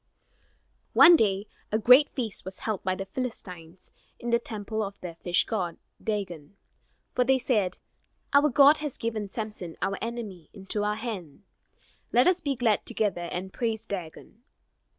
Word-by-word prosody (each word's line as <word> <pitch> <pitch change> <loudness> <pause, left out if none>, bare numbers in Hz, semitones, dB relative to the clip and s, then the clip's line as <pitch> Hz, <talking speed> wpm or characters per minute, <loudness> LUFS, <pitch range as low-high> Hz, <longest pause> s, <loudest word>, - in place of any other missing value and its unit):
One 345 +1 +9
day, 200 -6 +1 0.3
a 215 - +2
great 250 +6 +7
feast 230 -6 -3
was 190 0 -7
held 215 -4 -2
by 185 -1 0
the 195 - -5
Philistines 185 -7 -7 0.3
in 240 - -4
the 235 - +4
temple 220 -1 -4
of 200 -1 -5
their 175 -2 -6
fish 175 +1 +1
god, 180 -7 -3 0.3
Dagon. 195 -6 -4 0.6
For 250 - +3
they 265 +1 +3
said: 215 -8 0 0.6
"Our 285 +1 +6
god 285 +3 +6
has 300 -3 -4
given 220 -3 -3
Samson, 210 -6 -6
our 195 - -2
enemy, 220 -8 -6
into 200 +1 -3
our 210 0 0
hand. 210 - -6 0.7
Let 245 - +5
us 365 0 +3
be 280 -2 -1
glad 230 -4 +1
together 175 -5 -1
and 190 +1 -5
praise 225 -3 -2
Dagon." 195 +4 -7
210 Hz, 155 wpm, -27 LUFS, 190-240 Hz, 0.7 s, One